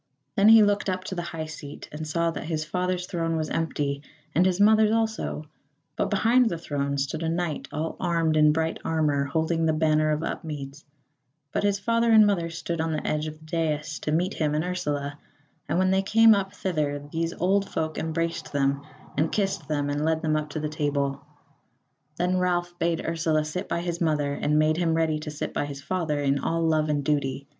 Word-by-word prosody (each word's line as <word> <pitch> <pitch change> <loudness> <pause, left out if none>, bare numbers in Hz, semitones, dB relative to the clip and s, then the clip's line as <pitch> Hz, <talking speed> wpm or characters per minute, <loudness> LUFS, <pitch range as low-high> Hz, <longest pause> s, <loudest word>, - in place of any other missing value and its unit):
Then 205 -1 +5
he 225 -1 +9
looked 205 -1 +1
up 185 0 -2
to 190 - -5
the 175 - -2
high 165 -2 -5
seat, 150 -2 -9
and 155 +1 -6
saw 170 +2 0
that 165 - -6
his 155 -1 -2
father's 180 +2 -1
throne 165 -2 -2
was 155 -1 -2
empty, 145 -3 -1 0.3
and 180 +4 +4
his 185 0 0
mother's 215 +1 +6
also; 220 -8 -1 0.5
but - - 0
behind 230 +4 +4
the 170 - -3
throne 140 -3 -2
stood 140 +3 -2
a 165 - -1
knight 170 -2 -2
all 155 +2 -3
armed 165 -3 +1
in 150 -1 +6
bright 160 +1 -1
armour 150 -3 +1
holding 160 +2 0
the 160 - +3
banner 155 0 +2
of 155 +1 0
Upmeads; 145 -3 -5 0.7
but - - 0
his 205 -1 +2
father 230 +3 +1
and 215 -1 +8
mother 180 -5 +1
stood 165 0 -3
on 160 0 -1
the 155 - -3
edge 150 0 -1
of 155 0 -7
the 155 - -17
dais 155 -1 -2
to 150 - -3
meet 175 +5 +1
him 150 -2 0
and 155 - +1
Ursula; 150 -5 -3 0.5
and - - +1
when 185 0 +3
they 190 0 +3
came 225 +3 +6
up 195 -1 0
thither 155 -8 -1
these 165 0 -1
old 195 +3 +1
folk 155 -1 -2
embraced 165 +1 -2
them 140 -1 +1 0.3
and 155 +3 +1
kissed 195 -7 -1
them 145 -2 -1
and 145 +1 -1
led 160 +1 0
them 155 -1 +1
up 155 0 -2
to 155 - -4
the 150 - -2
table. 140 -2 -1 0.9
Then 180 +1 +1
Ralph 175 -1 0
bade 170 -1 0
Ursula 160 -2 +1
sit 180 +6 -4
by 170 - -1
his 175 0 -3
mother, 150 -3 +1
and 150 +1 0
made 155 +1 +3
him 165 -2 +1
ready 160 -1 +1
to 150 - -6
sit 150 - -5
by - - -1
his 140 -1 -7
father 160 -4 -1
in 140 0 +1
all 165 0 -1
love 155 -1 +2
and 145 -1 0
duty. 140 -1 -1
160 Hz, 210 wpm, -26 LUFS, 150-180 Hz, 0.9 s, he